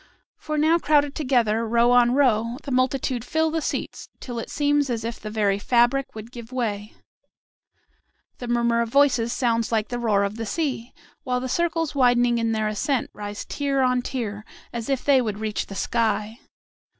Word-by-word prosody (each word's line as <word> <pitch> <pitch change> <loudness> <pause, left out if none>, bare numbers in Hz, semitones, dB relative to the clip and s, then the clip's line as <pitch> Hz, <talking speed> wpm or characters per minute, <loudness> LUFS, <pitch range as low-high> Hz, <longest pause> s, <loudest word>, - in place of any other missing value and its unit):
For 305 0 -4
now 315 +3 +3
crowded 290 -3 +2
together, 240 -7 +1
row 235 +2 +3
on 245 0 +4
row, 235 -4 +2
the 280 - -6
multitude 255 -1 0
fill 320 +4 0
the 325 0 -1
seats - - -4
till 245 -2 -6
it - - -6
seems 290 -1 +1
as 230 -2 -2
if 230 0 -5
the 215 - -7
very 205 -2 +1
fabric 240 +4 +2
would 220 +2 -9
give 235 -1 -10
way. 215 -4 -3 1.4
The 245 - -6
murmur 235 -1 +2
of 230 - -2
voices 250 -3 +3
sounds 230 -3 0
like 220 -2 0
the 245 -1 -3
roar 210 -4 +2
of 200 +2 -3
the 225 - -4
sea, 260 -4 -2 0.3
while 250 -4 -1
the 260 - -4
circles 330 +2 -1
widening 245 -3 +3
in 230 0 0
their 215 -1 0
ascent 230 +5 -1
rise 205 0 -6
tier 280 -2 -1
on 250 -1 +2
tier, 220 -5 -4 0.3
as 235 0 -5
if 270 -2 -1
they 275 -2 +5
would 215 -4 -3
reach 215 -1 -3
the 195 - -8
sky. 220 +1 -1
240 Hz, 185 wpm, -24 LUFS, 225-270 Hz, 1.4 s, they